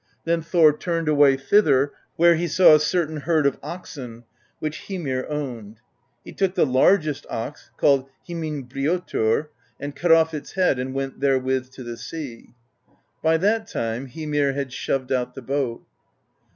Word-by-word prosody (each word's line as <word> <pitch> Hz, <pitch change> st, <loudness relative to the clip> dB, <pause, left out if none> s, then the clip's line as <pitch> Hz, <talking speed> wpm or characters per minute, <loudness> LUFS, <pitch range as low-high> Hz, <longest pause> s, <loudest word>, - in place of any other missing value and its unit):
Then 165 Hz, 0 st, 0 dB
Thor 165 Hz, -2 st, +4 dB
turned 165 Hz, 0 st, -2 dB
away 145 Hz, -3 st, +5 dB
thither 140 Hz, -3 st, +3 dB, 0.2 s
where 170 Hz, +1 st, +6 dB
he 170 Hz, +1 st, -1 dB
saw 170 Hz, +1 st, +6 dB
a 155 Hz, -, +7 dB
certain 155 Hz, 0 st, 0 dB
herd 155 Hz, 0 st, +1 dB
of 140 Hz, -, +1 dB
oxen, 125 Hz, -9 st, -8 dB, 0.3 s
which 155 Hz, 0 st, -5 dB
Hymir 145 Hz, -10 st, -3 dB
owned; 120 Hz, -8 st, -5 dB, 0.5 s
he -, -, -9 dB
took 190 Hz, -1 st, -1 dB
the 180 Hz, -, +4 dB
largest 150 Hz, +3 st, +2 dB
ox, 115 Hz, +6 st, -6 dB
called 135 Hz, -1 st, +3 dB, 0.2 s
Himinbrjotr,' 150 Hz, -4 st, -1 dB, 0.3 s
and 145 Hz, 0 st, -6 dB
cut 175 Hz, -1 st, +1 dB
off 160 Hz, 0 st, +5 dB
its 150 Hz, -2 st, -7 dB
head 180 Hz, -9 st, +2 dB
and 130 Hz, +1 st, -4 dB
went 135 Hz, -1 st, -4 dB
therewith 130 Hz, -1 st, +1 dB
to 130 Hz, -, -9 dB
the 120 Hz, -1 st, -7 dB
sea. 135 Hz, -7 st, -8 dB, 0.7 s
By 160 Hz, +1 st, +3 dB
that 215 Hz, +6 st, +1 dB
time 115 Hz, +4 st, -3 dB
Hymir 145 Hz, -1 st, -1 dB
had 135 Hz, -2 st, -4 dB
shoved 135 Hz, -1 st, -2 dB
out 125 Hz, -2 st, -1 dB
the 135 Hz, -, -8 dB
boat. 130 Hz, -2 st, -2 dB
145 Hz, 155 wpm, -23 LUFS, 130-165 Hz, 0.7 s, a